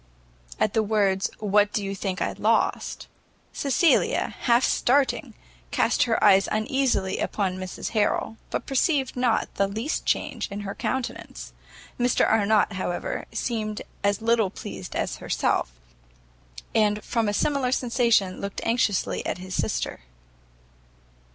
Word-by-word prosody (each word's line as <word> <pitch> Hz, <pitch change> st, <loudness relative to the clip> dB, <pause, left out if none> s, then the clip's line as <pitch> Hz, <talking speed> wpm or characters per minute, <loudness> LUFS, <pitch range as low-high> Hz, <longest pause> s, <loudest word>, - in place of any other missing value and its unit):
At 215 Hz, -, +1 dB
the 220 Hz, -, +3 dB
words 200 Hz, -3 st, +1 dB
what 210 Hz, 0 st, +2 dB
do 210 Hz, -, -1 dB
you 195 Hz, -, -3 dB
think 195 Hz, -1 st, -2 dB
I -, -, -1 dB
lost, -, -, 0 dB, 0.5 s
Cecilia, 285 Hz, +4 st, +2 dB
half 240 Hz, +1 st, +3 dB
starting, 270 Hz, +3 st, +1 dB, 0.3 s
cast -, -, +2 dB
her -, -, +1 dB
eyes 195 Hz, -2 st, +6 dB
uneasily 215 Hz, -3 st, 0 dB
upon 190 Hz, -3 st, -1 dB
Mrs 185 Hz, 0 st, -5 dB
Harrel, 220 Hz, +1 st, 0 dB
but -, -, -3 dB
perceived 270 Hz, 0 st, +1 dB
not 245 Hz, -2 st, +1 dB
the 200 Hz, -, +3 dB
least 220 Hz, +9 st, -3 dB
change -, -, -1 dB
in 200 Hz, 0 st, -5 dB
her 200 Hz, -1 st, -5 dB
countenance. 260 Hz, -2 st, -4 dB, 0.5 s
Mr 245 Hz, 0 st, +3 dB
Arnott, 215 Hz, -1 st, +3 dB
however, 185 Hz, -2 st, -3 dB
seemed 215 Hz, -3 st, -3 dB, 0.2 s
as 200 Hz, +1 st, +1 dB
little 225 Hz, -3 st, +3 dB
pleased 100 Hz, -, -8 dB
as -, -, -2 dB
herself, -, -, 0 dB, 1.0 s
and 210 Hz, -1 st, +2 dB
from 230 Hz, -3 st, 0 dB
a -, -, +1 dB
similar 265 Hz, +3 st, +1 dB
sensation 235 Hz, -7 st, +2 dB
looked 200 Hz, 0 st, -4 dB
anxiously 230 Hz, -4 st, 0 dB
at -, -, -2 dB
his 185 Hz, +1 st, -8 dB
sister. -, -, -2 dB
215 Hz, 130 wpm, -25 LUFS, 195-240 Hz, 1.0 s, eyes